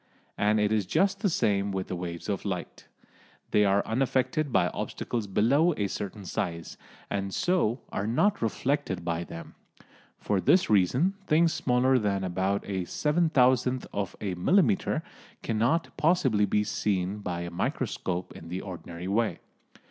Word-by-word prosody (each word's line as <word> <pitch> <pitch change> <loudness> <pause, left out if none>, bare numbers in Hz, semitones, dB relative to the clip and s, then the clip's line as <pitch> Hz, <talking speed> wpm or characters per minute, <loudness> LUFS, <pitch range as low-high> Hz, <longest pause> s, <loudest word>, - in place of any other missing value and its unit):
And 105 +1 +2
it 105 0 +2
is 105 -4 +1
just 195 - +2
the 200 - +1
same 100 - +1
with 95 -1 -2
the 90 - -4
waves 85 -1 -6
of 100 -2 -2
light; 95 -4 -5 0.6
they 105 - +4
are 100 0 +2
unaffected 135 +5 0
by - - +3
obstacles 115 -4 -4
below 140 - +3
a 100 - 0
certain 100 +1 -5
size, 85 -2 -4 0.4
and 100 -1 -2
so 175 - +1
are 100 - -2
not 195 - +2
reflected 115 -5 -1
by 85 0 -1
them. 85 -1 -9 0.6
For 100 -2 -1
this 180 - +3
reason 125 - +3
things 165 +2 +4
smaller 125 +1 +2
than 100 -3 0
about 95 +2 -1
a 95 -3 -2
seven 155 - +1
thousandth 130 -2 +3
of 100 -2 -3
a 100 -3 -2
millimetre 180 - +2 0.4
cannot 120 +9 0
possibly 150 - +3
be 105 +2 +2
seen 100 -2 -1
by 90 -4 -4
a 85 0 -5
microscope 90 +1 -3
in 85 - -10
the 90 +2 -4
ordinary 90 -1 -7
way. 110 +3 +1
105 Hz, 155 wpm, -28 LUFS, 95-135 Hz, 0.6 s, they